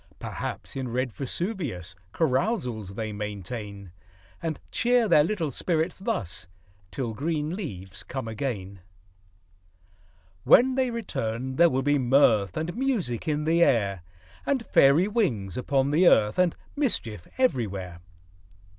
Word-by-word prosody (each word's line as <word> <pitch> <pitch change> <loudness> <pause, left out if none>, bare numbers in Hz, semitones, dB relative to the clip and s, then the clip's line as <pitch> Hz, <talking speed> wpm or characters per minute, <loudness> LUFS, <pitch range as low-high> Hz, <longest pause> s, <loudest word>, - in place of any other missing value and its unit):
Perhaps, - - -6
in 130 -1 -3
red 125 0 -2
Vesuvius 140 - -4 0.2
Carousals 125 - -1
they 110 -1 -4
maintain; 100 -1 -6 0.5
And 160 -2 -3
cheer 245 -1 +3
their 160 -6 +6
little 165 -4 -1
spirits 165 +6 -1
thus, 190 - -3 0.4
Till 120 +1 -3
green 155 +5 -2
leaves 95 - -7
come 130 -3 -5
again. 105 -5 -4 1.6
When 260 +2 +6
they 260 -1 +1
return, 130 - -3
there 170 0 +6
will 130 -2 0
be 145 +1 +2
mirth 120 -7 +3
And 165 +2 -3
music 225 - -1
in 150 -1 0
the 165 +2 +2
air, 100 - +2 0.4
And 265 -5 0
fairy 145 +8 +5
wings 130 - -1
upon 135 +2 +1
the 170 +4 +5
earth, 105 -1 +4
And 180 -2 +3 0.2
mischief 115 - -1
everywhere. 100 - -1
135 Hz, 125 wpm, -26 LUFS, 105-175 Hz, 1.6 s, their